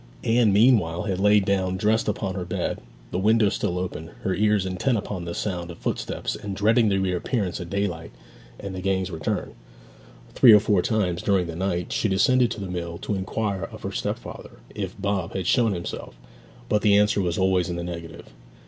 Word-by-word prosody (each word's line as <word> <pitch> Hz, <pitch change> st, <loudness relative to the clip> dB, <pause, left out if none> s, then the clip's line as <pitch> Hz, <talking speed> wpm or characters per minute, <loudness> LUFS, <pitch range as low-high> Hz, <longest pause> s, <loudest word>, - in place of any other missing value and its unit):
Anne 115 Hz, -2 st, +3 dB
meanwhile 105 Hz, -5 st, +3 dB
had 95 Hz, -3 st, -2 dB
lain 105 Hz, 0 st, +4 dB
down 95 Hz, -1 st, 0 dB
dressed 110 Hz, +3 st, +1 dB
upon 100 Hz, -2 st, -2 dB
her 90 Hz, -1 st, -4 dB
bed, 90 Hz, -, -3 dB, 0.3 s
the 90 Hz, -, -1 dB
window 110 Hz, +1 st, +4 dB
still 90 Hz, -2 st, -2 dB
open, 90 Hz, -3 st, -4 dB
her 95 Hz, -, 0 dB
ears 105 Hz, 0 st, +2 dB
intent 95 Hz, +7 st, 0 dB
upon 95 Hz, -3 st, -5 dB
the 85 Hz, -, -5 dB
sound 90 Hz, -4 st, -3 dB
of 85 Hz, -, -8 dB
footsteps -, -, -3 dB
and 100 Hz, -1 st, -6 dB
dreading 110 Hz, +3 st, +3 dB
the 100 Hz, -, +1 dB
reappearance 95 Hz, +2 st, -1 dB
of 85 Hz, -2 st, -7 dB
daylight 95 Hz, -4 st, -2 dB, 0.5 s
and 100 Hz, -1 st, -6 dB
the 95 Hz, -, -5 dB
gang's 95 Hz, -1 st, -1 dB
return. 80 Hz, -3 st, -3 dB, 0.8 s
Three 120 Hz, -4 st, +8 dB
or 105 Hz, -, +9 dB
four 105 Hz, -3 st, +2 dB
times 90 Hz, -4 st, 0 dB
during 95 Hz, -3 st, +2 dB
the 85 Hz, -1 st, -6 dB
night 90 Hz, -1 st, -2 dB
she 110 Hz, -, 0 dB
descended 120 Hz, +6 st, +3 dB
to -, -, -5 dB
the 100 Hz, -, -4 dB
mill 85 Hz, -2 st, -4 dB
to 100 Hz, -, -4 dB
inquire 100 Hz, 0 st, -2 dB
of -, -, -11 dB
her -, -, -3 dB
stepfather -, -, -5 dB, 0.2 s
if 100 Hz, -1 st, -5 dB
Bob 100 Hz, -3 st, -2 dB
had 95 Hz, -2 st, -2 dB
shown 115 Hz, +1 st, +3 dB
himself; 85 Hz, -, -6 dB, 0.5 s
but 105 Hz, -, +1 dB
the 105 Hz, -1 st, +5 dB
answer 105 Hz, 0 st, +3 dB
was 90 Hz, -2 st, -1 dB
always 95 Hz, -1 st, +2 dB
in 85 Hz, -, -3 dB
the 85 Hz, -, -4 dB
negative. 85 Hz, -6 st, -8 dB
95 Hz, 195 wpm, -24 LUFS, 90-105 Hz, 0.8 s, or